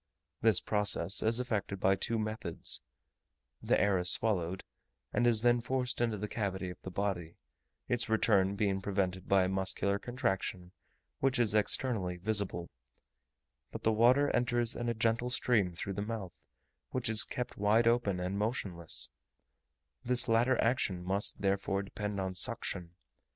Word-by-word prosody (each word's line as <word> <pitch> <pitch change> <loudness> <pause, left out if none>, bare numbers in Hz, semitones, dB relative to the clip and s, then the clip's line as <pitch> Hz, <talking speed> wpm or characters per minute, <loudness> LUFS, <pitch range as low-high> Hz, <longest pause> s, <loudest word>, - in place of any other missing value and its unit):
This 110 -5 +4
process 105 -3 +3
is 115 +2 +2
effected 105 -5 -3
by 95 +1 +3
two 115 +4 -1
methods: 110 0 0 0.8
the - - +2
air 100 -2 +2
is 90 0 +4
swallowed, 95 -4 +2 0.5
and 120 - +2
is 115 -2 +2
then 120 0 +3
forced 125 0 -1
into 115 -3 0
the 105 +1 -4
cavity 95 -4 -3
of - - -13
the - - -7
body, 90 -4 -3 0.5
its 120 -2 -1
return 100 -3 +3
being 100 -2 0
prevented 95 -2 -2
by 95 -1 +4
a - - 0
muscular 95 +1 -1
contraction 95 -7 -3 0.5
which 135 0 +1
is 115 -4 +1
externally 105 -4 +1
visible: 100 -3 -1 1.0
but - - -8
the 110 - +3
water 125 +6 +4
enters 120 -1 +1
in 120 0 -3
a 115 - -1
gentle 115 +2 0
stream 115 -6 +2
through 90 +3 -5
the 100 - -4
mouth, 105 -4 -5 0.6
which 130 -1 -2
is 110 -1 +5
kept 125 0 -5
wide 105 +3 +3
open 115 -6 +1
and 90 +2 -3
motionless; 100 -7 -3 0.9
this 125 0 +2
latter 120 +3 +2
action 105 -7 0
must, 95 +3 -2
therefore, 100 0 0
depend 105 0 -5
on 95 -1 -3
suction. 90 -4 -2
105 Hz, 150 wpm, -32 LUFS, 95-115 Hz, 1.0 s, is